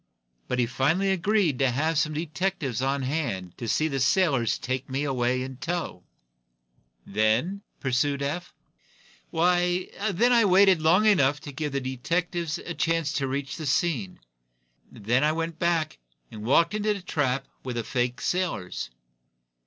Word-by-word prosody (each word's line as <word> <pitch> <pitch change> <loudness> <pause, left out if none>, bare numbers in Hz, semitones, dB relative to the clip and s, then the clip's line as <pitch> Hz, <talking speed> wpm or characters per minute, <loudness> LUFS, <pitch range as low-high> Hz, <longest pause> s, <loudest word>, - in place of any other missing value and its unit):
But 125 - -1
he 125 - +3
finally 145 +11 +1
agreed 190 -6 +1
to 135 -1 +3
have 155 +6 0
some 155 0 +1
detectives 155 - -2
on 135 +1 0
hand 125 - -3
to 120 - -4
see 155 +8 +2
the 135 -3 -2
sailors 135 - +2
take 130 +1 -4
me 135 +2 -1
away 130 -2 0
in 130 -1 -7
tow." 170 - -3 1.0
"Then 110 - +1
?" - - -46
pursued 140 +2 0
Eph. 165 +5 -3 0.8
"Why, 175 +2 +1 0.2
then 230 +7 +3
I 235 -1 +5
waited 190 -2 +5
long 175 +7 +4
enough 145 -9 +4
to 145 - -8
give 150 +2 -3
the 140 - +1
detectives 165 +5 -2
a 175 - -6
chance 165 -3 0
to 140 -1 -1
reach 135 +1 -3
the 155 -3 -4
scene. 135 - 0 0.7
Then 120 +6 0
I 155 +1 +3
went 165 0 -3
back 170 - 0 0.3
and 105 - -8
walked 165 - +3
into 210 0 0
the 200 - -7
trap 135 -5 0 0.2
with 125 -2 -4
the 120 - -2
fake 125 +1 -1
sailors." 170 - -2
145 Hz, 160 wpm, -26 LUFS, 130-175 Hz, 1.0 s, I